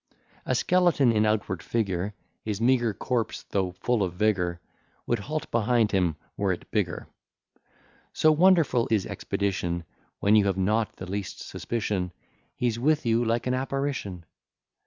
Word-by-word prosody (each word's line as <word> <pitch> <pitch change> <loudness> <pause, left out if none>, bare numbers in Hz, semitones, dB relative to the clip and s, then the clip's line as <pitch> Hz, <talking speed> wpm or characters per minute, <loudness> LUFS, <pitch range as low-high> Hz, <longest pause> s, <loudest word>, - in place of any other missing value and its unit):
A 130 - +1
skeleton 170 -3 +3
in 110 -1 +2
outward 100 -5 -1
figure, 100 -3 -2 0.3
His 105 -2 -3
meagre 120 -1 +3
corps, 120 -4 -2
though 95 -2 0
full 115 +5 0
of 90 -2 -1
vigour, 90 -4 +1 0.5
Would 120 - 0
halt 155 +10 -4
behind 115 -1 +2
him, 90 -5 +1 0.2
were 100 -2 0
it 90 - -6
bigger. 100 -6 -1 1.0
So 155 - +4
wonderful 160 -7 +4
his 105 -4 +2
expedition, 90 -4 -2 0.4
When 105 +1 +4
you 105 -2 +5
have 95 -1 0
not 105 +3 +1
the 95 - -7
least 100 +1 -5
suspicion, 100 -6 -2 0.4
He's 120 -2 -1
with 150 +3 +2
you 115 +1 +3
like 115 0 0
an 125 - +1
apparition. 130 - -3
110 Hz, 145 wpm, -27 LUFS, 95-125 Hz, 1.0 s, you